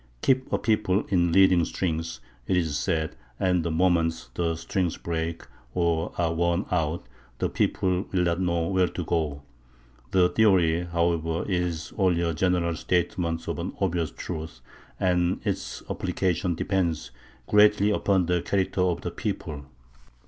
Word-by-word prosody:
Keep 130 0 +2
a - - +2
people 105 -3 +1
in 85 -3 +2
leading 95 -1 +5
strings, 80 -6 -3 0.3
it 90 - +2
is 80 -5 0
said, 80 +1 -1 0.2
and 90 -2 +2
the 85 - -1
moment 80 -1 +1
the 85 -1 0
strings 85 +1 -2
break, 85 0 -3 0.3
or 85 -1 +1
are 85 -2 +1
worn 85 +3 +1
out, 80 -1 0 0.3
the - - 0
people 90 0 0
will 90 -2 +2
not 85 +1 0
know 85 -2 +1
where 95 0 +2
to 90 - -5
go. 75 -4 -1 0.7
The 90 +2 +4
theory, 90 -6 +3
however, 85 -1 0
is 90 -4 -2
only 90 -3 +3
a 85 -1 0
general 85 0 +1
statement 85 -1 -1
of - - -3
an - - -4
obvious 85 -4 0
truth, 80 0 -7 0.4
and 90 -1 +1
its - - -3
application 90 -1 -1
depends 85 -7 -1 0.3
greatly 105 0 +5
upon 95 -3 +2
the 90 0 +1
character 95 0 0
of 90 -2 +1
the - - -4
people. 70 -3 -4
85 Hz, 150 wpm, -26 LUFS, 80-95 Hz, 0.7 s, leading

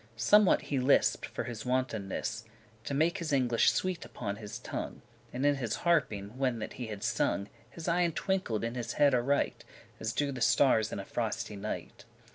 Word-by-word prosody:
Somewhat 185 - +5
he 140 - -1
lisped 130 +2 +3
for - - -4
his 115 -3 -6
wantonness, 115 -3 -2 0.4
To 140 - -2
make 165 +6 +2
his 165 -3 -3
English 125 -4 +3
sweet 185 -2 -1
upon 100 0 -5
his 105 -2 -7
tongue; - - -6 0.3
And 130 +3 -2
in 145 -1 +4
his 120 -5 -2
harping, 125 -9 +1
when 130 -3 +1
that 110 - -5
he 125 - -6
had 105 -1 -6
sung, 115 -3 0 0.2
His 165 +6 -8
eyen* 170 -1 +2
twinkled 185 - -1
in 115 0 -2
his 120 -2 -4
head 145 -2 +4
aright, 130 +3 +1
*eyes - - -29 0.3
As 110 0 -2
do 140 +4 0
the 130 -2 -6
starres 110 -5 +4
in - - -4
a 100 - -6
frosty 110 -2 -3
night. 100 - -6
125 Hz, 190 wpm, -31 LUFS, 110-145 Hz, 0.4 s, Somewhat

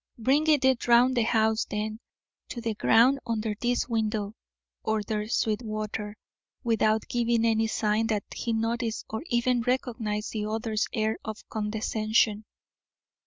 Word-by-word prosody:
"Bring 275 +7 +2
it 265 -6 +3
round 245 +2 +5
the 240 - +3
house, 220 -1 +2
then, 215 +1 -4 0.5
to 240 - -5
the 230 -1 -2
ground 235 +6 +4
under 220 -2 -1
this 245 0 0
window," 215 -3 -1 0.5
ordered 215 0 -2
Sweetwater, 215 -2 -2 0.5
without 220 -2 +1
giving 235 -1 +1
any 225 -1 +2
sign 220 0 0
that 210 -3 0
he 235 - -2
noticed 225 0 -1
or 220 - -3
even 240 0 +1
recognised 230 -4 -2
the 210 -1 -3
other's 220 0 -1
air 220 0 -1
of 220 0 -7
condescension. 215 0 0
220 Hz, 130 wpm, -27 LUFS, 215-235 Hz, 0.5 s, round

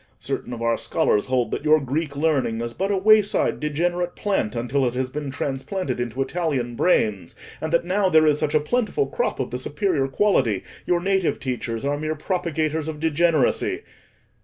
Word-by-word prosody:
Certain - - -4
of 115 -1 -5
our 115 0 +1
scholars 105 - +1
hold 130 -2 0
that - - -3
your 155 0 +5
Greek 140 +2 -3
learning 140 -7 +1
is 120 0 -4
but 195 +8 -2
a 200 - +1
wayside 210 +1 +3
degenerate 175 +4 -1
plant 195 - -1
until 125 +4 0
it 125 -1 0
has 130 0 -2
been 145 0 -4
transplanted 135 +2 -3
into 120 +2 -1
Italian 135 -7 -2
brains, 105 - +1 0.3
and 160 - -3
that 170 0 +2
now 190 +2 +2
there 155 -3 +5
is 150 -1 +3
such 155 -1 0
a - - +6
plentiful 245 - 0
crop 485 - -2
of - - -2
the - - -3
superior 175 -10 0
quality, 135 - +1 0.2
your 175 -1 +2
native 190 -2 +1
teachers 125 -2 -3
are 145 +1 0
mere 155 +1 -2
propagators 160 -2 -2
of 155 -2 -5
degeneracy. 160 -2 +1
150 Hz, 185 wpm, -23 LUFS, 130-175 Hz, 0.3 s, a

